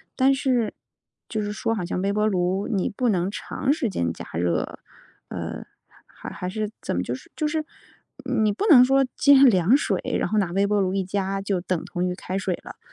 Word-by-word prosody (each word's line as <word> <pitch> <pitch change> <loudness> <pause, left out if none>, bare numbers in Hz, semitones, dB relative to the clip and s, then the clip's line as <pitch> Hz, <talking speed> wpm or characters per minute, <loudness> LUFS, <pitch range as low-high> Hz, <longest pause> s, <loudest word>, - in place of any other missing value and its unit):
但 270 +1 +4
是 255 -5 0 0.5
就 220 - -2
是 205 0 -3
说， 225 +2 -1
好 190 -5 -3
像 180 +1 -2
微 200 +1 0
波 210 +1 +1
炉 190 -1 0
你 195 -4 0
不 245 +3 -1
能 185 -1 +1
长 265 +6 -2
时 285 -8 -1
间 85 - -1
加 - - -9
热， 85 +1 -1 0.5
呃， - - -6 0.4
还 - - -10
还 180 - -5
是 215 +1 -3
怎 - - -3
么。 90 - 0
就 120 - -3
是 130 - -9
就 305 - 0
是 310 -1 -2 0.8
你 210 -1 +2
不 415 - -2
能 255 -8 +9
说 270 +1 +3
接 285 0 +6
凉 205 -2 +5
水， 290 - 0 0.2
然 - - -1
后 215 - 0
拿 180 -4 0
微 195 +2 +2
波 205 0 +1
炉 190 -1 0
一 195 -1 0
加 195 +1 -2
就 195 -2 -1
等 180 -2 -2
同 180 +1 -2
于 180 - -2
开 185 0 -4
水 185 -2 -1
了。 - - -10
那 - - -24
200 Hz, 235 characters per minute, -24 LUFS, 185-235 Hz, 0.8 s, 能